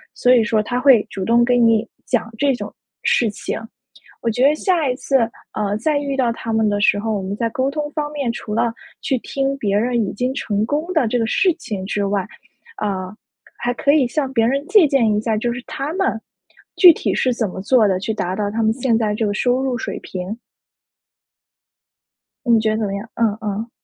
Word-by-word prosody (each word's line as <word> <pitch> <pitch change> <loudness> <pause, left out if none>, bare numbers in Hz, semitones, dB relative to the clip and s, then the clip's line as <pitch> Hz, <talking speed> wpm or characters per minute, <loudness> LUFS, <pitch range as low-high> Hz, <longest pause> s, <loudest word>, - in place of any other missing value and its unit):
所 250 +1 +4
以 235 - +4
说， 220 0 +1
他 245 +4 -2
会 255 -5 +6
主 190 -2 -4
动 235 +2 +4
跟 245 0 +3
你 225 0 +3 0.2
讲 235 -3 -1
这 280 +3 +2
种 245 - -6 0.3
事 230 -3 +2
情。 210 - -5 0.6
我 230 - +1
觉 245 +3 -1
得 295 - +4
下 335 -3 +1
一 250 - 0
次 270 +1 +1 0.3
呃， 205 -1 -1
再 290 +7 0
遇 280 -1 -3
到 245 -3 +1
他 230 - -6
们 220 0 +2
的 205 0 0
时 205 - +3
候， 220 +2 -2
我 195 - -3
们 190 +2 -4
在 230 +1 0
沟 260 +4 -1
通 295 0 -3
方 295 -1 -3
面， 280 -5 -2
除 215 -2 -6
了 230 +1 +1 0.3
去 265 - 0
听 275 +3 -2
别 205 -5 0
人 240 +2 +1
已 - - -5
经 250 +5 -1
成 210 -5 -1
功 295 +8 -2
的 315 -7 +3
这 245 - 0
个 225 - 0
事 365 - +2
情 205 - -5
之 205 +1 -1
外 195 -2 -1 0.5
呃， 190 -2 -3 0.4
还 245 +1 -1
可 280 - +2
以 290 -4 +4
向 270 +1 -2
别 225 -3 +2
人 275 +4 0
借 390 -5 +5
鉴 235 -6 +2
一 210 - +1
下， 220 0 -1
就 235 +3 -1
是 245 +1 -6
他 275 +3 -4
们 375 - 0 0.6
具 360 - +9
体 325 - +1
是 255 -2 +1
怎 230 -2 -1
么 185 - -7
做 225 +2 +3
的， 190 -2 0
去 220 +3 -2
达 180 -3 -2
到 205 +1 -2
他 225 +2 -1
们 220 0 +3
现 240 -1 +1
在 215 -2 0
这 215 +1 -1
个 205 - -1
收 245 +4 +1
入 260 -2 -1
水 230 - -4
平。 185 +4 -6 2.1
你 235 -2 +4
觉 220 0 +1
得 215 - -1
怎 220 - -1
么 195 - -3
样？ 200 +3 -6
嗯 225 -3 +1
嗯。 215 +2 -3
230 Hz, 240 characters per minute, -20 LUFS, 210-270 Hz, 2.1 s, 具